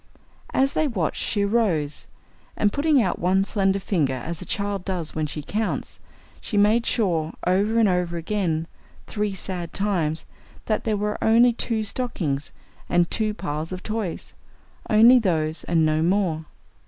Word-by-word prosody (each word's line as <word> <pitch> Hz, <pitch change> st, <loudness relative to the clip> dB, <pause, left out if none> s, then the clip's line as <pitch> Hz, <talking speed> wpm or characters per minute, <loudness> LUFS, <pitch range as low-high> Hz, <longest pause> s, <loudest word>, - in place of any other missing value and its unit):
As 270 Hz, +1 st, +2 dB
they 310 Hz, -, +1 dB
watched, 190 Hz, -, -2 dB
she 205 Hz, -2 st, 0 dB
arose, 195 Hz, -10 st, 0 dB, 0.5 s
and 205 Hz, -1 st, +2 dB
putting 290 Hz, -1 st, +3 dB
out 185 Hz, -, -1 dB
one 190 Hz, +2 st, +2 dB
slender 195 Hz, -2 st, +1 dB
finger 160 Hz, -9 st, 0 dB
as 155 Hz, +6 st, -5 dB
a -, -, -6 dB
child 200 Hz, -2 st, -1 dB
does 180 Hz, -5 st, -3 dB
when 155 Hz, -1 st, -1 dB
she 150 Hz, 0 st, -6 dB
counts, 215 Hz, +7 st, -3 dB, 0.4 s
she 210 Hz, -, -3 dB
made 215 Hz, +3 st, +4 dB
sure 170 Hz, -8 st, +1 dB
over 200 Hz, +5 st, +2 dB
and 225 Hz, -2 st, +5 dB
over 180 Hz, -2 st, 0 dB
again 165 Hz, -2 st, -1 dB, 0.4 s
three 210 Hz, -2 st, -2 dB
sad 180 Hz, -3 st, -4 dB
times 175 Hz, -6 st, -1 dB, 0.4 s
that 215 Hz, -, -1 dB
there 215 Hz, -2 st, +1 dB
were 210 Hz, +1 st, -2 dB
only 235 Hz, +2 st, +5 dB
two 225 Hz, -1 st, -1 dB
stockings 185 Hz, -, -2 dB, 0.4 s
and 175 Hz, -1 st, +2 dB
two 215 Hz, -1 st, 0 dB
piles 155 Hz, -4 st, -4 dB
of 185 Hz, 0 st, -6 dB
toys! 215 Hz, -5 st, -4 dB, 0.6 s
Only 235 Hz, +4 st, +7 dB
those 160 Hz, -6 st, -1 dB
and 165 Hz, -2 st, +2 dB
no 155 Hz, 0 st, +2 dB
more. 170 Hz, -3 st, +1 dB
195 Hz, 155 wpm, -24 LUFS, 165-215 Hz, 0.6 s, Only